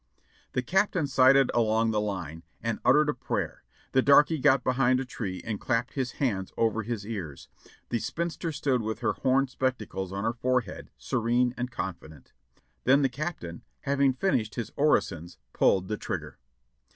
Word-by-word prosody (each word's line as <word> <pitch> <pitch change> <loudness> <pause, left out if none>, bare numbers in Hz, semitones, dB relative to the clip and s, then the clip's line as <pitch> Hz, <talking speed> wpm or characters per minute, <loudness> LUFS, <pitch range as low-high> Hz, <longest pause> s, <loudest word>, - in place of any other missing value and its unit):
The 125 - 0
Captain 190 0 +1
sighted 135 0 +5
along 115 -1 +2
the 105 -1 +1
line, 90 -6 -4 0.2
and 115 0 -2
uttered 150 +5 +5
a 150 - +1
prayer; - - -3 0.3
the 130 - +4
darky 145 +3 +5
got 135 -2 +4
behind 130 0 +2
a 135 - -3
tree 100 -7 -5
and 110 -3 -4
clapped 115 +2 -1
his 130 -3 -2
hands 100 -9 -1
over 115 -1 +1
his 110 -2 -4
ears; 95 - -6 0.4
the 120 - 0
spinster 170 +4 -3
stood 140 -4 0
with 110 0 -4
her - - +1
horn 135 +1 +2
spectacles 110 -8 -3
on 100 +1 -4
her 115 +1 0
fore 125 +1 +1
head, 100 -6 -10
serene 120 +1 +1
and 125 0 -3
confident; 85 - -7 0.5
then 140 +3 +4
the 135 - +3
Captain, 125 - -5 0.2
having 140 -1 +2
finished 125 - 0
his 120 - -4
orisons, 85 - +1 0.2
pulled 95 -1 +3
the 105 - -2
trigger. - - -5
125 Hz, 165 wpm, -28 LUFS, 105-135 Hz, 0.5 s, sighted